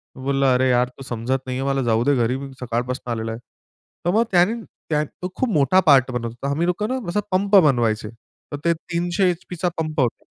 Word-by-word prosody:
मी 130 - -10
बोलला, 135 -1 +2
"अरे 130 +1 +2
यार 125 0 +2
तू 135 - -9
समजत 130 +2 -3
नाही 130 -1 -3
आहे, 135 - -2
मला 135 -1 +1
जाऊ 115 0 +2
दे 145 -1 +3
घरी. 125 +2 +1
मी 140 0 -7
सकाळपासनं 125 +1 -3
आलेलो 115 -1 -3
आहे." 115 - -6 0.7
तर 175 - +3
मग 225 +2 +4
त्यांनी 190 +6 +3 0.3
त्यां 150 -1 +1
तो 180 +5 -8
खूप 260 - 0
मोठा 150 +5 +4
पार्ट 135 -3 +6
बनवत 120 -1 -3
होता. 130 +4 -5
आम्ही 160 +4 0
लोकं 190 +4 0
ना 260 0 -1
असा 210 - 0
पंप 200 +2 +2
बनवायचे. 120 - +3 0.4
तर - - -2
ते 170 - +4
300 175 +3 -1
एचपीचा 180 0 -3
पंप 155 -1 -2
होता. 120 -3 -1
140 Hz, 220 wpm, -22 LUFS, 125-175 Hz, 0.7 s, पार्ट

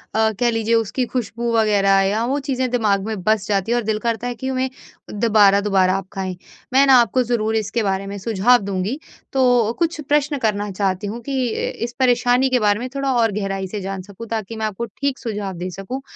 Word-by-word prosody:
अ, 220 0 +3
कह 240 -1 +3
लीजिए 225 0 +1
उसकी 230 +3 0
खुशबू 235 -1 -2
वग़ैरह 200 -3 +3
या 220 +3 0
वो 275 +4 0
चीज़ें 260 -2 -2
दिमाग 205 -5 +1
में 215 -4 -4
बस 215 -1 +1
जाती 200 +2 0
है - - +3
और 240 - -1
दिल 215 0 -1
करता 235 +1 -2
है 245 - -3
कि 260 +4 -4
उन्हें 260 0 -1 0.4
दोबारा-दोबारा 200 -3 +3
आप 195 -1 -7
खाएँ। 190 -2 -3 0.4
मैं 275 +1 +6
ना 265 - +7
आपको 240 +3 +1
ज़रूर 225 -2 0
इसके 220 +1 -1
बारे 195 -1 -1
में 200 0 -5
सुझाव 225 +4 +3
दूँगी। 200 +8 -2 0.3
तो 245 -4 +3
कुछ 335 -1 0
प्रश्न 290 0 +1
करना 210 -3 -1
चाहती 190 0 -1
हूँ 225 +4 -5
कि 260 -2 -1
अ, - - -2
इस 240 +1 -4
परेशानी 250 +1 +3
के 255 -1 +2
बारे 205 0 +2
में 255 - -4
थोड़ा 275 -1 0
और 230 -3 +2
गहराई 195 -1 -3
से 205 +1 -5
जान 195 0 -4
सकूँ 200 +4 -11
ताकि 225 0 -4
मैं 220 0 -2
आपको 215 +2 -3
ठीक 275 +5 -3
सुझाव 205 -4 -4
दे 180 +1 -4
सकूँ। 195 +9 -6
220 Hz, 215 wpm, -20 LUFS, 200-245 Hz, 0.4 s, ना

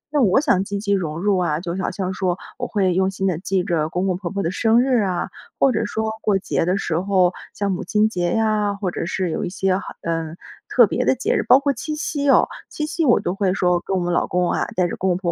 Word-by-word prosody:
那 290 - +4
我 210 0 +4
想 230 - +2
积 200 +1 -4
极 200 0 -2
融 165 -5 -2
入 195 0 +2
啊， 160 -3 0
就 175 -1 -4
好 - - -1
像 190 -1 -3
说 185 -1 -1 0.2
我 - - -2
会 190 -4 +1
用 190 +1 +2
心 195 0 -3
地 180 -4 0
记 190 0 0
着 160 -3 0
公 180 +3 -1
公 185 -2 +1
婆 180 -2 -5
婆 200 +1 -3
的 165 - -1
生 225 +3 +3
日 255 -3 +2
啊， 185 -3 -1 0.3
或 275 - +4
者 225 -1 0
说 220 +1 -2
过 205 -2 +2
节 185 - -1
的 185 +2 +1
时 170 -4 -1
候， 185 -1 +2 0.2
像 200 -1 -1
母 180 - -3
亲 210 +4 +2
节 175 -4 -1
呀， 215 -2 +1
或 200 -3 -3
者 170 - -4
是 185 -2 -1
有 - - -2
一 - - -2
些 190 0 0
好 195 - -6
嗯， 165 0 -3 0.3
特 - - +6
别 - - -1
的 - - +3
节 - - 0
日， - - +2
包 265 - +6
括 280 0 0
七 305 +5 -5
夕 285 -2 -1
哦， - - +5 0.2
七 300 - -3
夕 320 +1 -1
我 240 - +5
都 175 - -2
会 195 -1 0
说 180 -2 +2
跟 190 - -1
我 - - 0
们 175 0 -1
老 - - +1
公 180 -1 0
啊， - - 0
带 180 -1 +2
着 - - -4
公 190 - 0
公 180 - +1
婆 175 -2 -2
190 Hz, 295 characters per minute, -21 LUFS, 175-210 Hz, 0.3 s, 特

